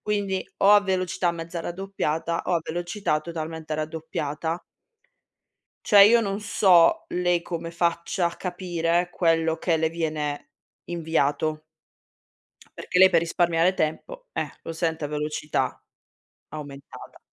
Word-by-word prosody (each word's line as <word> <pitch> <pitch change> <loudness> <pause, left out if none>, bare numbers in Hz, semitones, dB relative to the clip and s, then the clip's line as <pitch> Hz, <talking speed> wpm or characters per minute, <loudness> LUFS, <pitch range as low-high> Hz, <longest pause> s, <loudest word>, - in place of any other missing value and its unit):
Quindi 200 -3 -1
o 200 - +5
a 205 - +8
velocità 185 -2 0
mezza 170 0 -6
raddoppiata 170 -2 -3
o 180 - +1
a 170 - +1
velocità 175 -1 -2
totalmente 160 -1 -5
raddoppiata. 155 +1 -4 1.2
Cioè 205 -2 +7
io 230 +4 +7
non 200 -2 -2
so 185 -5 +4
lei 175 -1 +1
come 170 -1 -5
faccia 170 +1 0
a 170 - -7
capire 175 -1 -1
quello 165 -1 +1
che 165 -3 +1
le 160 0 +1
viene 155 -3 -3 0.3
inviato. 155 -2 -1 1.2
Perché 180 - -1
lei 190 0 +9
per 170 - +4
risparmiare 170 +1 +2
tempo, - - -3
eh, - - -3
lo - - -5
sente 160 -1 -2
a - - -3
velocità 150 -2 -2 0.7
aumentata. 140 -2 -10
170 Hz, 125 wpm, -25 LUFS, 160-180 Hz, 1.2 s, lei